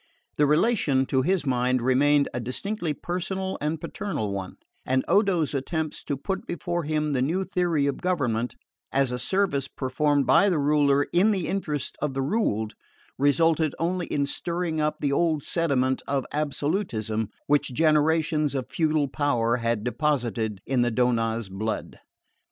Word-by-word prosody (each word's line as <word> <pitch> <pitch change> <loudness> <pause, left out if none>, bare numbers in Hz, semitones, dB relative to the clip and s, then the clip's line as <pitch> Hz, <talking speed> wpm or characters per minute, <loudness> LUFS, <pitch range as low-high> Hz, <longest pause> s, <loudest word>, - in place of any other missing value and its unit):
The 145 - +4
relation, 150 - +2
to 130 0 +1
his 180 +2 +1
mind, 125 -1 +1
remained 140 +4 +3
a 120 - -2
distinctly 170 - -3
personal 190 +4 -3
and 150 +2 -1
paternal 165 - -3
one; 95 -1 -5 0.3
and 130 0 0
Odo's 180 -6 +2
attempts 155 +3 -3
to 140 - -2
put 190 +8 -4
before 175 -2 -3
him 150 -1 0
the 130 - +1
new 170 +9 0
theory 175 -6 0
of 140 - -2
government, 125 -10 0 0.4
as 135 -2 +1
a 125 - -3
service 160 -2 0
performed 140 +2 0
by 135 +11 +5
the 175 - +1
ruler 145 -1 +3
in 185 +5 +4
the 190 -5 0
interest 155 -8 -3
of 145 -2 -1
the 135 - 0
ruled, 110 - 0 0.5
resulted 155 +2 +3
only 175 +1 -1
in 140 -1 0
stirring 170 +2 -2
up 150 0 0
the 145 - +1
old 155 0 +1
sediment 130 -6 0
of 135 -2 0
absolutism 145 - -1 0.2
which 145 -2 +2
generations 155 +1 +2
of 130 -1 -4
feudal 155 -3 +1
power 120 -5 +1
had 115 -2 -1
deposited 120 -6 -1
in 130 -2 +1
the 120 0 +2
Donnaz 115 -2 +1
blood. 105 +3 -4
145 Hz, 155 wpm, -26 LUFS, 130-165 Hz, 0.5 s, by